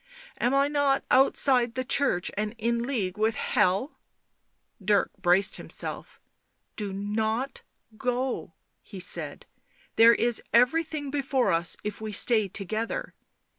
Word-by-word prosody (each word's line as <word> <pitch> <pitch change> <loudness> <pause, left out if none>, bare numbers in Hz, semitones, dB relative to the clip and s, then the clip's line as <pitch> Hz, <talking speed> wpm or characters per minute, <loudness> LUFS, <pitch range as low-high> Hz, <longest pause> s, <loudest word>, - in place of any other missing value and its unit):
Am 245 - +1
I 275 +1 +3
not 285 -2 0
outside 255 -2 +3
the 255 - -2
Church 250 -10 +2
and 210 +2 -3
in 235 +1 -1
league 210 -7 -3
with 220 +1 +1
Hell 195 - 0 0.8
V' 195 - -18
Dirk 205 0 +2
braced 185 +2 +3
himself. - - -6 0.3
" - - -49
Do 205 -2 -4
not 220 +6 -3 0.3
go," 250 +2 -3 0.3
he 195 - -11
said. 180 - +1 0.3
" - - -34
There 230 +1 +7
is 240 -1 +1
everything 290 +3 +1
before 270 -6 0
us 170 0 +1
if 210 +1 -5
we 215 -1 -5
stay 215 0 +3
together... 215 +4 -4
230 Hz, 135 wpm, -26 LUFS, 205-265 Hz, 0.8 s, There